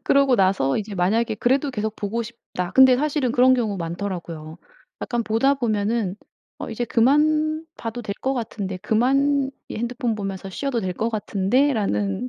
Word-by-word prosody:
그러고 275 -2 +4
나서 185 -9 +2
이제 210 -1 -4
만약에 215 +5 +1
그래도 270 +6 +1
계속 220 -2 -3
보고 215 +3 -2
싶다. 220 -6 -6
근데 260 -1 +7
사실은 285 -3 0
그런 255 +1 +5
경우 220 -5 -1
많더라고요. 170 -2 -5 0.4
약간 240 -1 -1
보다 230 +6 +2
보면은 215 -5 -1 0.4
어 - - -6
'이제 240 +2 -2
그만 305 +6 +2
봐도 230 +1 -5
될 200 -2 -4
거 265 - 0
같은데 210 -6 -4
그만 270 +6 +2 0.2
이 - - -6
핸드폰 240 +1 -2
보면서 195 -2 -5
쉬어도 250 +3 -2
될 185 -2 -2
거 225 - -1
같은데.'라는 200 - 0
225 Hz, 345 characters per minute, -23 LUFS, 195-260 Hz, 0.4 s, 근데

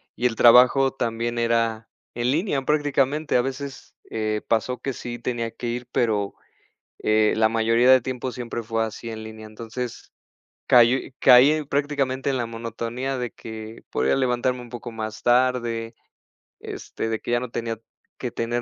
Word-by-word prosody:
y 125 - +2
el 115 -2 -4
trabajo 125 +3 +6
también 120 -1 -2
era 115 -1 0 0.2
en 120 +1 0
línea, 150 -2 0
prácticamente. 145 0 +1
A 125 - +5
veces, 135 +1 -6 0.2
eh, 110 -1 -2
pasó 115 +3 0
que 135 - -3
sí 120 -1 -6
tenía 115 -1 -3
que 120 - -6
ir, 120 +1 -4
pero, 105 -4 0 0.7
eh, 110 0 +3
la 110 0 +5
mayoría 115 +2 +3
de 130 -1 +7
tiempo 130 0 -4
siempre 120 -1 -5
fue 115 0 -1
así 110 +1 -6
en 110 -1 -6
línea. 110 0 -9
Entonces, 115 +3 -7 0.6
cayó 125 +1 +6 0.2
caí 125 +4 +8
en 155 -1 -2
prácticamente 140 -2 0
en 135 - 0
la 120 -2 -1
monotonía 115 +3 -4
de 125 -2 -3
que 110 0 -9
podía 65 +2 +1
levantarme 125 -1 0
un 120 - -12
poco 120 0 -7
más 110 -1 -6
tarde, 120 -2 +1 0.7
este, 115 - -5
de 110 - -1
que - - -5
ya 120 - +3
no 125 -1 -5
tenía 115 -1 -4 0.4
que 125 - -3
tener 120 +1 -2
120 Hz, 170 wpm, -24 LUFS, 115-130 Hz, 0.7 s, caí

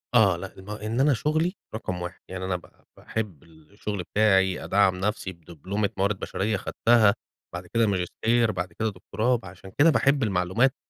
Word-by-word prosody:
آه، 100 -6 +6
لأ، 95 +2 -7
ما 105 +2 -7
إن 115 +4 -1
أنا 140 +1 +5
شُغلي 155 - 0 0.2
رقم 90 -5 -4
1، 90 0 -6
يعني 95 0 -5
أنا 90 -1 -1
ب 90 - -5 0.4
باحب 100 -10 -5
الشغل 90 +4 -7
بتاعي، 95 -2 +2
أدعّم 100 -2 +3
نفسي 100 0 -2
بدبلومة 90 +5 -3
موارد 100 +1 +1
بشرية 105 +2 -1
اخدتها، 110 +1 +3 0.4
بعد 90 0 -6
كده 115 +2 +2
ماجستير، 110 +5 +1
بعد 90 -2 -4
كده 110 +3 -1
دكتوراه. 110 +6 -1
فعشان 95 -2 -12
كده 160 +3 +7
باحب 140 -3 +3
المعلومات، 105 +7 +2
100 Hz, 165 wpm, -26 LUFS, 90-110 Hz, 0.4 s, كده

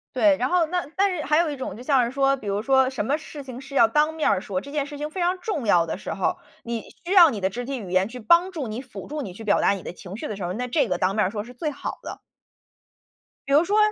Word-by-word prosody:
对， 305 -2 +5
然 255 0 0
后 355 -2 +3
那 355 +2 -2
但 390 -1 +2
是 305 - -3
还 300 +2 +2
有 335 -1 +3
一 290 - -3
种 255 -7 -6
就 245 - -9
像 265 -2 +3
是 235 - -2
说， 275 0 +2
比 260 - -12
如 200 +1 0
说 265 +2 +3
什 255 -6 -3
么 280 +6 +1
事 305 -2 -9
情 255 -1 -8
是 275 +1 -10
要 230 - +6
当 300 +7 +2
面 320 -1 +1
儿 185 - +2
说， 195 -2 -3
这 280 - -10
件 290 -1 -1
事 290 0 -8
情 300 +1 -4
非 360 +4 -5
常 360 +2 +1
重 355 - -3
要 175 -5 +4
的 165 - -4
时 - - -5
候， 195 - 0 0.3
你 235 -1 -3 0.2
需 360 - -1
要 350 -4 +9
你 225 -7 -4
的 190 -1 0
肢 245 +5 -5
体 265 +1 -4
语 195 -5 -8
言 185 +2 +2
去 250 +2 -8
帮 340 - +4
助 310 -8 -4
你、 220 +3 -5
辅 235 -7 -10
助 300 +1 -4
你 200 - -6
去 220 +5 -10
表 205 - +3
达 - - +4
你 195 -3 -3
的 - - -6
情 180 +2 -9
绪 - - -5
的 215 - -4
时 195 - -6
候， 175 - -2
那 245 +6 -3
这 255 -1 +1
个 180 - 0
当 185 +2 +1
面 215 - +3
儿 185 - -1
说 210 -1 -4
是 245 - -11
最 300 +5 -3
好 285 - -6
的。 - - -7 1.3
比 275 - 0
如 300 +3 +6
说 410 +5 +1
260 Hz, 335 characters per minute, -24 LUFS, 210-305 Hz, 1.3 s, 要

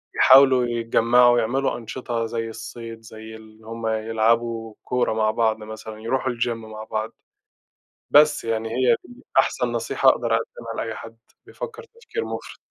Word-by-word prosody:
يحاولوا 130 -2 +6
يتجمّعوا 120 +1 +3
ويعملوا 120 +4 0
أنشطة 120 0 -4
زي 115 0 -3
الصيد، 115 0 -9
زي 110 0 -11
اللي 110 0 -16
هُم 115 0 -5
يلعبوا 115 +1 0
كورة 125 -3 0
مع 110 -1 +1
بعض 110 -1 +1
مثلًا، 110 0 -9
يرُوحوا 130 +2 -1
الgym 120 0 -1
مع 110 -1 -9
بعض. 110 +1 -4 1.0
بس 150 +1 +5
يعني 115 0 -2
هي 120 0 +3
دي 245 +1 -15 0.2
أحسن 125 -2 +1
نصيحة 120 +3 +2
أقدَر 115 -3 +1
أقدِّمها 115 0 -5
لأي 110 -1 -5
حد 115 0 -10 0.3
بيفكّر 460 +2 -8
تفكير 460 0 -7
مُفرِط. - - -7
115 Hz, 145 wpm, -23 LUFS, 110-125 Hz, 1.0 s, يحاولوا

